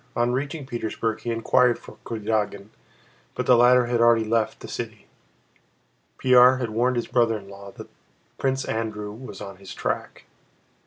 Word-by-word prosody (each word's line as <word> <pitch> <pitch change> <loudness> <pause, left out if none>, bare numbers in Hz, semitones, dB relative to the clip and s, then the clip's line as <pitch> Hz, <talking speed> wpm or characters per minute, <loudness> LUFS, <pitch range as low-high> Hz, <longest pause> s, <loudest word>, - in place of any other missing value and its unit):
On 120 +1 +1
reaching 140 +2 -3
Petersburg 115 -2 -3
he 115 - -5
inquired 120 +1 +3
for - - -14
Kurágin 105 -2 -2 0.7
but - - -2
the 125 - +6
latter 125 +1 +5
had 120 -1 0
already 115 -1 +5
left 110 0 -1
the - - -8
city. - - -6 1.1
Pierre 125 0 +6
had 120 -3 -3
warned 125 +3 +1
his 120 - -1
brother 115 -3 +2
in 100 -2 -12
law 100 0 -11
that - - -10 0.5
Prince 135 0 0
Andrew 110 -2 -3
was 125 +5 -10
on 100 -1 -8
his 95 0 -10
track. - - -4
115 Hz, 160 wpm, -24 LUFS, 110-125 Hz, 1.1 s, the